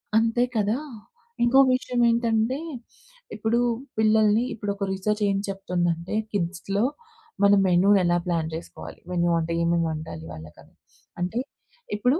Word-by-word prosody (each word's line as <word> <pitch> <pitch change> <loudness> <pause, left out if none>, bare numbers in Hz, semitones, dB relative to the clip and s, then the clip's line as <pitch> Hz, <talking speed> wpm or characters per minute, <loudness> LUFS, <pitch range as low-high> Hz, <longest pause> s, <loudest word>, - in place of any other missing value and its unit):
అంతే 230 +2 +3
కదా! 215 +2 +1 0.7
ఇంకోక 265 +3 +6
విషయం 250 -1 -1
ఏంటంటే, 230 +1 +1 0.8
ఇప్పుడూ 225 +3 0 0.4
పిల్లల్ని 220 0 +4
ఇప్పుడొక 200 -2 -4
రిసెర్చేం 200 +1 0
చెప్తుందంటే, 175 -3 -2 0.2
కిడ్స్‌లో 195 +2 -1 0.6
మనం 200 0 +6
మెను 180 +2 +4
ఎలా 175 0 +2
ప్లాన్ 165 -2 0
జేసుకోవాలి? 85 - -8
మెను 175 -1 +1
అంటే 165 0 -3
ఏమేముండాలి 160 - -1
వాళ్ళకని? 80 +1 -12 0.5
అంటే, 185 +7 -1 0.6
ఇప్పుడూ 250 +9 +2
200 Hz, 110 wpm, -25 LUFS, 170-220 Hz, 0.8 s, ఇంకోక